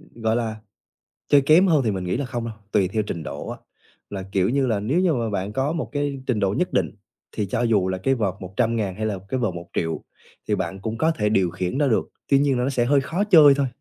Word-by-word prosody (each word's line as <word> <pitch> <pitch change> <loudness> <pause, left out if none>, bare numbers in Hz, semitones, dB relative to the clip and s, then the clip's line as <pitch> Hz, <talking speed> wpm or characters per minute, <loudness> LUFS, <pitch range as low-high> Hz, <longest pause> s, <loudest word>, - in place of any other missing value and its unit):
gọi 115 -1 0
là, 110 -2 -2 0.7
chơi 145 - +6
kém 155 +7 +5
hơn 155 -5 +4
thì 110 - +2
mình 95 -2 -3
nghĩ 90 +4 -1
là 140 - -2
không 120 -2 -4
đâu, 115 - -5 0.2
tùy 100 -3 +3
theo 105 +3 -1
trình 85 -6 -5
độ - - -6
á. - - -5 0.5
Là, 95 -2 -5
kiểu 95 +1 +2
như 135 +1 +1
là, 110 -4 +1
nếu 130 - 0
như 180 -3 +3
mà 115 -4 -1
bạn 100 0 -3
có 135 +6 0
một 165 - -3
cái 145 -2 -2
trình 120 -5 +1
độ 100 -1 +1
nhất - - -1
định - - +1 0.4
thì 105 - -2
cho 100 - -2
dù 105 -6 +2
là 95 - -1
cái 135 +8 +1
vợt 105 -6 -1
100.000 105 +1 -1
hay 110 +2 -3
là 105 -3 -2
cái 130 - -1
vợt 110 -7 0
1.000.000 85 -1 -4 0.4
thì - - +2
bạn 95 - -4
cũng 110 +2 -4
có 160 +4 +2
thể 105 -8 0
điều 95 -5 +2
khiển 90 +5 -3
nó 145 -1 +2
được, 115 - +1 0.2
tuy 140 - +5
nhiên 140 -2 +2
là 125 - 0
nó 130 - 0
sẽ 125 -3 +1
hơi 140 +2 +3
khó 170 +9 -1
chơi 160 -9 +7
thôi. 140 -1 0
115 Hz, 265 wpm, -23 LUFS, 100-140 Hz, 0.7 s, chơi